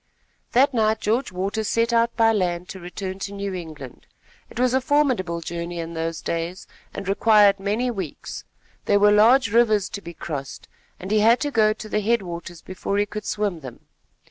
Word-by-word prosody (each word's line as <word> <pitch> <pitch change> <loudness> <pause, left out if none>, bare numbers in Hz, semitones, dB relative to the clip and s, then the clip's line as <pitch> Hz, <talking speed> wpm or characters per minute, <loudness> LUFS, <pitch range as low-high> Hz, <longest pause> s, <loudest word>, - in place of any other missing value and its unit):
That 270 +3 +4
night 220 -2 +2
George 225 +3 0
Waters 200 +4 -2
set 230 +2 +1
out 230 0 +2
by 225 -1 +5
land 180 -3 -1
to 190 - -8
return 185 +2 -6
to 200 +1 -5
New 200 -1 -4
England. 155 -7 -9 0.4
It - - -8
was 250 0 +2
a 260 - +2
formidable 255 - +1
journey 170 +1 -5
in 165 0 -5
those 165 0 -4
days, 170 +2 -3 0.3
and 195 - -7
required 205 0 +4
many 215 +6 -1
weeks. 190 -9 -6 0.4
There 205 - +3
were 205 0 +5
large 225 +2 +5
rivers 215 -4 +3
to 200 - -6
be 170 -2 -10
crossed, 145 -5 -6 0.3
and 190 +2 -7
he 215 - +4
had 230 +3 +5
to 290 - -1
go 215 -4 +3
to 215 0 -9
the 210 0 -1
headwaters 175 -6 -2
before 185 +2 -3
he 205 - +2
could 210 0 -7
swim 205 -5 -2
them. 130 -5 -10
200 Hz, 190 wpm, -23 LUFS, 175-225 Hz, 0.4 s, by